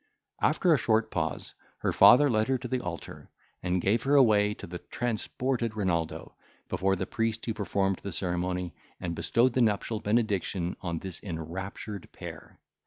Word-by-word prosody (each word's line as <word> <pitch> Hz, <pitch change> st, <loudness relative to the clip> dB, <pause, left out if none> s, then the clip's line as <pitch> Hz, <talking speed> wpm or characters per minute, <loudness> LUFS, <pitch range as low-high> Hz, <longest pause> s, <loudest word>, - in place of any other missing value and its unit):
After 175 Hz, -3 st, +3 dB
a 145 Hz, -, +3 dB
short 110 Hz, 0 st, +2 dB
pause, -, -, -3 dB, 0.3 s
her -, -, +1 dB
father 140 Hz, +4 st, +7 dB
led 110 Hz, -4 st, +2 dB
her 135 Hz, 0 st, +2 dB
to 125 Hz, -, -6 dB
the 130 Hz, 0 st, -1 dB
altar, 90 Hz, -2 st, -7 dB, 0.3 s
and 90 Hz, 0 st, 0 dB
gave 105 Hz, +6 st, +2 dB
her 140 Hz, +3 st, +2 dB
away 105 Hz, -6 st, +5 dB
to -, -, -9 dB
the 90 Hz, +1 st, -7 dB
transported 120 Hz, 0 st, -2 dB
Renaldo, 85 Hz, -5 st, -1 dB, 0.4 s
before 95 Hz, +1 st, +1 dB
the -, -, -2 dB
priest 115 Hz, 0 st, -2 dB
who 115 Hz, -, -1 dB
performed 100 Hz, -2 st, 0 dB
the 100 Hz, -, -5 dB
ceremony, 90 Hz, -1 st, -2 dB, 0.3 s
and 85 Hz, -, -3 dB
bestowed 120 Hz, +8 st, +2 dB
the 130 Hz, -, +2 dB
nuptial 110 Hz, 0 st, +1 dB
benediction 100 Hz, -5 st, 0 dB
on 85 Hz, -2 st, -2 dB
this 90 Hz, +1 st, -6 dB
enraptured 95 Hz, +3 st, -6 dB
pair. -, -, -10 dB
105 Hz, 165 wpm, -29 LUFS, 90-115 Hz, 0.4 s, father